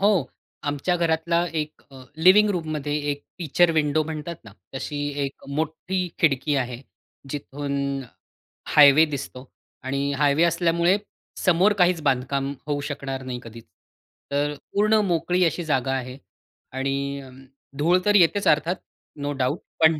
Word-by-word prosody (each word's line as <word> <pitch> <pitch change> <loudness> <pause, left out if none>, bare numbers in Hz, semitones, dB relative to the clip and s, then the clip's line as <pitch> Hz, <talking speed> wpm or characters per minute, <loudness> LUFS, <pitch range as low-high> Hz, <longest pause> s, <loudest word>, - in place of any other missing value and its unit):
हो. 195 -7 +3 0.4
आमच्या 145 +5 0
घरातला 170 0 +1
एक 155 -1 -4
अ, 130 -1 -12
लिव्हिंग 190 +6 +6
रूममध्ये 155 -5 -2 0.2
एक 145 0 -4 0.2
फिचर 170 +1 +3
विंडो 155 -1 +2
म्हणतात 160 +1 -5
ना 110 - -12 0.2
तशी 145 +2 -4 0.3
एक 135 - -8
मोठी 160 +5 -2
खिडकी 145 -1 +2
आहे. 125 -2 -2 0.5
जिथून 140 -1 -3 0.7
हायवे 150 +1 +7
दिसतो 140 -3 -6 0.4
आणि 140 +2 -1
हायवे 145 +2 +3
असल्यामुळे 170 +2 +2 0.4
समोर 185 +4 +3
काहीच 180 -3 +3
बांधकाम 135 +1 0
होऊ 145 -1 -1
शकणार 135 -2 -5
नाही 125 -1 -5
कधीच. 115 0 -11 0.7
तर 145 +1 0 0.2
पूर्ण 210 +2 +3
मोकळी 180 0 +1
अशी 170 +2 -1
जागा 135 -3 0
आहे. 130 0 -5 0.5
आणि 140 +1 -2
अ, 135 - -12 0.5
धूळ 170 +5 +3
तर 205 0 +4
येतेच 200 +2 +4
अर्थात 160 +4 +3 0.5
नो 145 0 -2
डाउट. 135 +3 -1 0.2
पण 160 -1 +5
150 Hz, 135 wpm, -24 LUFS, 140-170 Hz, 0.7 s, हायवे